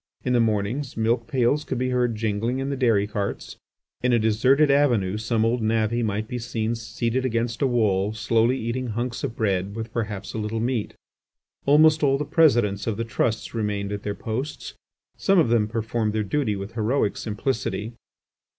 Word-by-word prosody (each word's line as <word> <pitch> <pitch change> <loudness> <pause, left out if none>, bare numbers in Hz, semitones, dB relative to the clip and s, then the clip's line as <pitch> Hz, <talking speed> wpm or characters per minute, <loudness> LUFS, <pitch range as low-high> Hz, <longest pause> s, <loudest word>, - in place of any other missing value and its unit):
In 125 - 0
the 120 - +4
mornings, 115 +5 -1
milk 115 +1 +1
pails 140 +1 +1
could 130 - -3
be 130 +1 0
heard 125 -2 +1
jingling 110 +3 -1
in 135 +1 -2
the - - -1
dairy 115 -6 +2
carts. 105 -1 -4 0.4
In 125 0 +2
a - - +5
deserted 130 +7 +3
avenue 120 -10 +2
some 110 0 0
old 120 +1 +1
navvy 110 +1 +1
might 110 -1 -1
be 125 - -4
seen 115 -1 -2
seated 115 +2 -2
against 115 -1 -1
a 140 - +4
wall 105 -5 +1
slowly 115 +3 +1
eating 125 +2 -3
hunks 120 +2 -3
of 115 - -3
bread 100 -2 -1
with 115 0 -6
perhaps 105 -4 -4
a - - -3
little 110 +1 -2
meat. 120 -2 -2 0.7
Almost 155 +2 +6
all 135 -2 +3
the 150 - -3
presidents 120 - +3
of 110 -3 -1
the 115 - -2
trusts 110 0 -1
remained 105 -3 -2
at 105 -1 -4
their 105 0 -3
posts. 125 +9 -5 0.4
Some 195 - +2
of 160 -9 +4
them 115 -3 +3
performed 110 -1 -2
their 110 -1 0
duty 105 +1 0
with 100 +2 -6
heroic 115 0 0
simplicity. 110 0 -3
115 Hz, 185 wpm, -24 LUFS, 105-125 Hz, 0.7 s, Almost